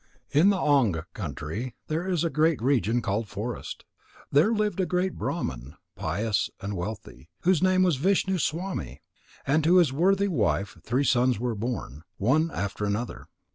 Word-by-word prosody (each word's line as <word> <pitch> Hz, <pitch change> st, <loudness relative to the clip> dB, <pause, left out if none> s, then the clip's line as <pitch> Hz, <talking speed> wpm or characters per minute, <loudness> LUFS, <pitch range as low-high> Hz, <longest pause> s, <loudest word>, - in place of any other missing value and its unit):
In 155 Hz, +8 st, +5 dB
the 200 Hz, -, +3 dB
Anga 120 Hz, -, +2 dB
country 90 Hz, -, -5 dB
there 165 Hz, +4 st, -2 dB
is 175 Hz, -4 st, +1 dB
a 165 Hz, -, 0 dB
great 155 Hz, +1 st, +2 dB
region 120 Hz, -2 st, +1 dB
called 105 Hz, +3 st, -1 dB
Forest. 110 Hz, +5 st, -6 dB, 0.5 s
There 155 Hz, +10 st, +4 dB
lived 210 Hz, -4 st, 0 dB
a 185 Hz, -, +1 dB
great 180 Hz, +1 st, 0 dB
Brahman, 65 Hz, -, -4 dB, 0.2 s
pious 100 Hz, +5 st, -1 dB
and 100 Hz, +1 st, -4 dB
wealthy, 90 Hz, -, -7 dB
whose 180 Hz, -2 st, +3 dB
name 185 Hz, 0 st, +4 dB
was 175 Hz, -6 st, +2 dB
Vishnu 190 Hz, +4 st, +1 dB
swami. 175 Hz, +5 st, -3 dB, 0.4 s
To 160 Hz, +5 st, +4 dB
his 165 Hz, -7 st, +4 dB
worthy 195 Hz, +6 st, +3 dB
wife 105 Hz, -, 0 dB
three 125 Hz, +4 st, +1 dB
sons 125 Hz, -3 st, +2 dB
were 120 Hz, 0 st, -1 dB
born, 105 Hz, -, -4 dB, 0.2 s
one 150 Hz, +10 st, +2 dB
after 100 Hz, -, -4 dB
another. 105 Hz, +4 st, -3 dB
135 Hz, 155 wpm, -27 LUFS, 105-175 Hz, 0.5 s, In